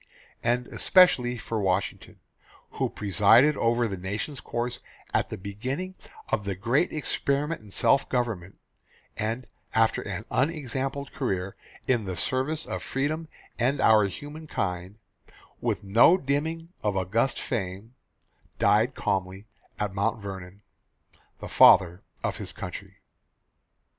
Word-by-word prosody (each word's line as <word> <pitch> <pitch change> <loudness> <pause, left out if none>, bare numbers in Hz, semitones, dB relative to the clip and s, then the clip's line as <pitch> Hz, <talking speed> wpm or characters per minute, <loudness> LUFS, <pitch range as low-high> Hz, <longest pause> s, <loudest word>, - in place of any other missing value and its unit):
And 120 +1 +1
especially 130 -10 +4
for 110 -1 -3
Washington, 95 0 -2 0.5
who - - -1
presided 110 +8 +4
over 120 0 +2
the 100 -3 -4
nation's 105 +9 -4
course 120 +1 -3 0.3
at - - +1
the - - -5
beginning 130 - -4 0.4
of 105 - 0
the 100 -1 -3
great 120 - +1
experiment 150 0 -1
in 105 - -15
self 135 - +3
government 115 -8 -2 0.6
and, 115 +4 -3 0.3
after 110 0 +3
an 100 +1 -5
unexampled 135 -1 -2
career 95 -9 -2 0.3
in 120 -5 +2
the 95 -1 -4
service 130 - -1
of - - -4
freedom 155 +4 -2 0.3
and 130 +4 +1
our 110 -4 +5
humankind, 100 - -5 0.6
with - - -1
no 115 - +6
dimming 160 +3 -2
of 105 -2 0
august 110 +8 +1
fame, 100 0 -4 0.6
died 115 +5 +3
calmly 95 +1 -2 0.3
at 105 -2 -1
Mount 100 +3 0
Vernon 95 0 -8 0.8
the - - -7
Father 90 +1 +6 0.2
of - - -1
his - - -5
Country. - - -8
115 Hz, 125 wpm, -27 LUFS, 100-135 Hz, 0.8 s, no